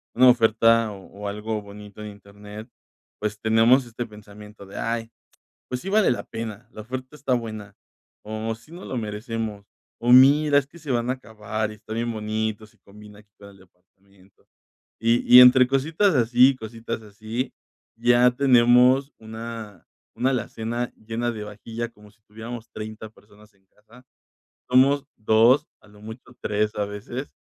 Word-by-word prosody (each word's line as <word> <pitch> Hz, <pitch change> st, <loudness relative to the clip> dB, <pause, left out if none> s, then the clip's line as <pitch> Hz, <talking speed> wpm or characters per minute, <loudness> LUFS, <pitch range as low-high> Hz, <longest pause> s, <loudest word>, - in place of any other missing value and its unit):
una 130 Hz, +1 st, +7 dB
oferta, 115 Hz, -1 st, +3 dB
o 95 Hz, -, -11 dB, 0.2 s
o -, -, -3 dB
algo 105 Hz, +1 st, -4 dB
bonito 105 Hz, 0 st, -12 dB
en 105 Hz, -, -7 dB
internet, 105 Hz, +2 st, -12 dB, 0.5 s
pues 105 Hz, 0 st, -3 dB
tenemos 115 Hz, +4 st, +4 dB
este 120 Hz, +1 st, -6 dB
pensamiento 105 Hz, -1 st, -14 dB
de: 95 Hz, -, -11 dB
"Ay, 115 Hz, 0 st, -3 dB, 0.6 s
pues 125 Hz, 0 st, -3 dB
sí, 195 Hz, -, -6 dB
vale 215 Hz, 0 st, +3 dB
la 120 Hz, -, -2 dB
pena. 115 Hz, 0 st, -7 dB
La 110 Hz, -, -9 dB
oferta 130 Hz, +5 st, -7 dB
está 135 Hz, -3 st, -2 dB
buena", 110 Hz, -4 st, -6 dB, 0.5 s
o 110 Hz, +1 st, -4 dB
"sí 115 Hz, +8 st, -21 dB
nos 175 Hz, +2 st, -10 dB
lo 130 Hz, -, -4 dB
merecemos". 110 Hz, -1 st, -5 dB, 0.3 s
O: 120 Hz, +1 st, +1 dB
"Mira, 145 Hz, +3 st, +6 dB
es 135 Hz, -, -6 dB
que 170 Hz, +4 st, -16 dB
se 150 Hz, -, -11 dB
van 120 Hz, 0 st, 0 dB
a -, -, +2 dB
acabar, 110 Hz, -3 st, -5 dB
y -, -, -10 dB
está 110 Hz, +1 st, -10 dB
bien 115 Hz, +1 st, -2 dB
bonito. 110 Hz, 0 st, -3 dB
Sí 115 Hz, -, -28 dB
combina 105 Hz, +1 st, -15 dB
aquí 105 Hz, -1 st, -23 dB
con 100 Hz, 0 st, -13 dB
el 100 Hz, -, -18 dB
departamento". 95 Hz, +1 st, -26 dB, 0.5 s
Y 115 Hz, +2 st, +4 dB
y 125 Hz, -, +13 dB
entre 125 Hz, 0 st, +8 dB
cositas 160 Hz, +8 st, +1 dB
así, 125 Hz, +1 st, +5 dB
y 135 Hz, -, -5 dB
cositas 115 Hz, 0 st, -7 dB
así, 110 Hz, +4 st, -5 dB, 0.4 s
ya 120 Hz, +1 st, +4 dB
tenemos 125 Hz, +1 st, +4 dB
una 110 Hz, -3 st, -9 dB, 0.3 s
una 130 Hz, -, +1 dB
alacena 120 Hz, -1 st, -3 dB
llena 115 Hz, +2 st, -3 dB
de 110 Hz, -, -7 dB
vajilla 115 Hz, +3 st, -6 dB
como 105 Hz, -2 st, -19 dB
si 110 Hz, 0 st, -32 dB
tuviéramos 110 Hz, +2 st, -9 dB
30 110 Hz, 0 st, -8 dB
personas 105 Hz, 0 st, -21 dB
en 95 Hz, -1 st, -35 dB
casa. 110 Hz, +6 st, -21 dB, 0.7 s
Somos 135 Hz, +2 st, +4 dB
2, 110 Hz, +5 st, +4 dB
a -, -, -22 dB
lo 105 Hz, 0 st, -18 dB
mucho 110 Hz, +4 st, -11 dB
3, 105 Hz, +1 st, -1 dB
a 105 Hz, -, 0 dB
veces. 105 Hz, +7 st, -7 dB
110 Hz, 170 wpm, -24 LUFS, 105-125 Hz, 0.7 s, y